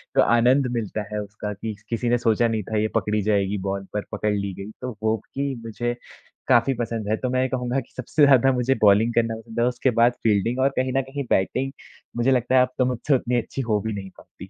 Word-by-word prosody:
तो -, -, +6 dB
आनंद 125 Hz, +3 st, +4 dB
मिलता 110 Hz, -1 st, -3 dB
है 105 Hz, -, -1 dB
उसका 105 Hz, 0 st, -6 dB
स -, -, -12 dB
कि 110 Hz, -1 st, -3 dB, 0.2 s
किसी 120 Hz, +1 st, -1 dB
ने 120 Hz, -, +3 dB
सोचा 115 Hz, 0 st, +2 dB
नहीं 110 Hz, -2 st, -1 dB
था, 110 Hz, +3 st, -3 dB
ये 105 Hz, +1 st, +2 dB
पकड़ी 105 Hz, 0 st, +1 dB
जाएगी 100 Hz, -1 st, +1 dB
बॉल 95 Hz, 0 st, -3 dB
पर 105 Hz, -1 st, -2 dB
पकड़ 105 Hz, 0 st, -1 dB
ली 100 Hz, -1 st, -3 dB
गई। 100 Hz, +3 st, -8 dB
तो 125 Hz, -2 st, -5 dB
वो 110 Hz, 0 st, +2 dB, 0.2 s
कि 140 Hz, 0 st, -2 dB
मुझे 120 Hz, +2 st, -3 dB, 0.5 s
काफ़ी 120 Hz, +3 st, +4 dB
पसंद 115 Hz, -2 st, -3 dB
है, 110 Hz, -, +1 dB
तो 125 Hz, -, -2 dB
मैं 130 Hz, 0 st, +1 dB
ये 130 Hz, -, +1 dB
कहूँगा 125 Hz, 0 st, -1 dB
कि 130 Hz, -, -12 dB
सबसे 145 Hz, +4 st, +3 dB
ज़्यादा 135 Hz, -1 st, +5 dB
मुझे 125 Hz, +1 st, +1 dB
बॉलिंग 105 Hz, +3 st, +5 dB
करना 115 Hz, -1 st, +1 dB
पसंद 115 Hz, +1 st, -7 dB
है, 120 Hz, -, +3 dB
उसके 125 Hz, +1 st, 0 dB
बाद 120 Hz, +1 st, +5 dB
फील्डिंग 115 Hz, +3 st, +1 dB
और 135 Hz, +1 st, +4 dB
कहीं 130 Hz, 0 st, 0 dB
न -, -, +3 dB
कहीं 135 Hz, +2 st, -5 dB
बैटिंग 130 Hz, +8 st, +1 dB, 0.5 s
मुझे 120 Hz, +3 st, +2 dB
लगता 125 Hz, 0 st, +2 dB
है 130 Hz, -, +7 dB
अब 125 Hz, 0 st, +1 dB
तो 130 Hz, -, +3 dB
मुझसे 125 Hz, +3 st, +1 dB
उतनी 125 Hz, -1 st, 0 dB
अच्छी 135 Hz, -, -5 dB
हो 110 Hz, -4 st, 0 dB
भी 110 Hz, -, -2 dB
नहीं 95 Hz, -2 st, -6 dB
पाती। 95 Hz, -, -13 dB
115 Hz, 245 wpm, -23 LUFS, 105-125 Hz, 0.5 s, है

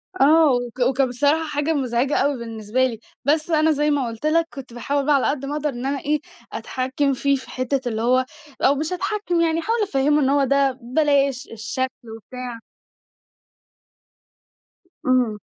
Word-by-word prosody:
آه، 310 Hz, -1 st, +5 dB
وك 245 Hz, 0 st, -2 dB
وكان 260 Hz, +1 st, +2 dB
بصراحة 290 Hz, +6 st, +1 dB
حاجة 295 Hz, +2 st, -1 dB
مُزعِجة 260 Hz, 0 st, 0 dB
أوي 280 Hz, 0 st, +1 dB
بالنسبة 230 Hz, +2 st, -1 dB
لي. 230 Hz, -4 st, -3 dB, 0.3 s
بس 305 Hz, +3 st, +1 dB
أنا 315 Hz, 0 st, +4 dB
زي 295 Hz, 0 st, +1 dB
ما 275 Hz, -4 st, 0 dB
قُلت 230 Hz, +4 st, -7 dB
لك 330 Hz, +2 st, +2 dB
كنت 265 Hz, -4 st, -9 dB
باحاول 280 Hz, +3 st, -1 dB
بقى 295 Hz, 0 st, +4 dB
على 275 Hz, -, +2 dB
قد 275 Hz, -1 st, -2 dB
ما 285 Hz, -, -4 dB
أقدر 300 Hz, 0 st, -1 dB
إن 245 Hz, -1 st, -6 dB
أنا 275 Hz, 0 st, -1 dB
إيه 300 Hz, +1 st, 0 dB, 0.3 s
أتحكَّم 265 Hz, +2 st, -1 dB
فيه 280 Hz, +2 st, +1 dB
في 260 Hz, -, -8 dB
حتّة 255 Hz, +1 st, -1 dB
اللي 220 Hz, -1 st, -3 dB
هو 255 Hz, +2 st, +3 dB, 0.4 s
أو 275 Hz, -, +4 dB
مش 310 Hz, +5 st, -2 dB
أتحكَّم 375 Hz, -2 st, -1 dB
يعني، 325 Hz, 0 st, +2 dB
أحاول 450 Hz, +7 st, 0 dB
أفهِّمه 295 Hz, -3 st, +2 dB
إن 265 Hz, -, +2 dB
هو 280 Hz, 0 st, +3 dB
ده 275 Hz, -1 st, +2 dB
بلاش، 275 Hz, 0 st, +1 dB
الشكل 235 Hz, +1 st, -4 dB
وبتاع. 245 Hz, +1 st, -8 dB, 2.5 s
إمم. 250 Hz, -4 st, +2 dB
275 Hz, 170 wpm, -22 LUFS, 255-300 Hz, 2.5 s, آه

